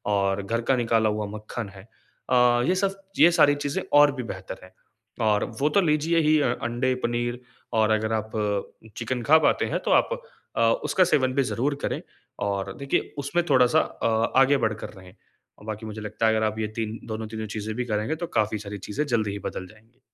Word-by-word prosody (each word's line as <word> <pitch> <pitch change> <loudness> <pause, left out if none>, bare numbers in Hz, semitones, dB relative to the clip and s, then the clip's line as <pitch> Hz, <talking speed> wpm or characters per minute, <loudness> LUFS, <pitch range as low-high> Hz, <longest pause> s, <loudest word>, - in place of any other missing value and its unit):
और 100 0 +1
घर 115 +4 -1
का - - +4
निकाला 115 -2 +2
हुआ 105 0 -2
मक्खन 105 0 -6
है, 95 - -11 0.5
अ, 125 -1 +4
ये 185 - +3
सब 195 +1 -1 0.2
ये 170 - +8
सारी 145 -4 +5
चीजें 145 +5 -2 0.2
और 145 0 +7
भी 130 - -4
बेहतर 95 -4 -7
हैं 95 - -15 0.5
और 105 -1 +3 0.2
वो 145 +2 +2
तो 200 - +3
लीजिए 160 0 +2
ही 155 0 +4
अ 125 -4 +2
अंडे, 120 +2 0
पनीर 120 +1 -1 0.3
और 110 -1 +3
अगर 110 0 +1
आप 110 0 -2 0.7
चिकन 125 +1 -2
खा 155 +5 +6
पाते - - +2
हैं - - -1
तो - - +1
आप - - +4 0.5
अ, - - +2 0.2
उसका 185 - +3
सेवन 130 -7 +2
भी 140 +1 +2
ज़रूर 140 +5 0
करें - - -2 0.5
और 100 -1 -2
देखिए 140 0 -1
उसमें 145 +5 0
थोड़ा-सा 125 -3 +5
अ, 115 0 -1
आगे 140 +1 +5
बढ़कर 110 -1 -3
रहें, 95 0 -15 0.5
बाकी 110 0 -5
मुझे 110 0 -7
लगता 105 +1 -1
है 110 - +3
अगर 110 0 +1
आप 110 0 -2
ये 110 - -1
3 110 0 -3
दोनों 110 0 -4
तीनों 110 0 -5
चीज़ें 110 +1 -4
भी 125 +1 -2
करेंगे 110 +6 -1
तो 170 +2 -5
काफ़ी 110 0 0
सारी 100 0 -7
चीज़ें 145 +8 -1
जल्दी 110 -5 0
ही 100 - -5
बदल 95 - -7
जाएँगी। 110 +5 -21
115 Hz, 205 wpm, -25 LUFS, 110-140 Hz, 0.7 s, ये